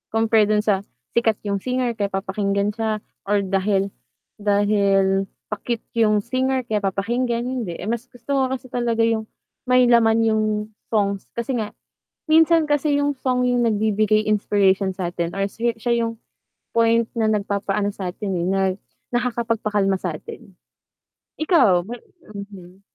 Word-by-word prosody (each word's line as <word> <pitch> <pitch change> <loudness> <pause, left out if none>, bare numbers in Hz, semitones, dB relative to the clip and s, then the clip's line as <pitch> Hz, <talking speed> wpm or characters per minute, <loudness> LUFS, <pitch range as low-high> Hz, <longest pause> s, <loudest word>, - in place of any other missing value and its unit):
Compare 225 -1 +4
do'n 210 0 +2
sa 205 -3 +2 0.3
sikat 230 -2 +2
yung 200 -1 -1
singer 250 0 0
kaya 200 - +1
papakinggan 200 +1 -1
siya 220 -1 -2 0.2
or 205 0 +2
dahil, 195 +1 0 0.5
dahil 200 -2 +2 0.2
pa-cute 225 +2 -3 0.2
yung 210 -2 +3
singer 260 +2 0
kaya 220 -3 -1
papakinggan, 235 +5 -1
hindi, 245 -8 -3
eh, - - -7
mas 235 +2 -3
gusto 270 +3 -3
ko - - +3
kasi 255 -1 -11
talaga 235 -2 +1
yung 225 -1 0 0.4
may 250 0 +5
laman 225 -1 +4
yung 220 -1 +2 0.4
song. 200 -3 +1 0.2
Kasi 240 +1 -2
nga, 215 -1 -5 0.5
minsan 320 0 +5
kasi 290 0 +2
yung 285 -1 0
song 250 -1 +1
yung 245 -1 +2
nagbibigay 215 0 +2
inspiration 200 -2 +2
sa'tin 175 -2 -3
or 195 0 -1
si 235 +3 -1
siya 235 -1 +1
yung 230 - -3 0.6
point 230 0 +3
na 220 -1 +2
nagpapaano 200 -1 -1
sa'tin, 195 +2 -4
eh, 170 - -1
nag 190 0 +1 0.4
nakakapagpakalma 230 -5 0
sa'tin. 180 +2 -7 0.9
Ikaw 310 - +4
may 240 - -5 0.3
mhm. 195 -2 -10
215 Hz, 140 wpm, -22 LUFS, 200-235 Hz, 0.9 s, may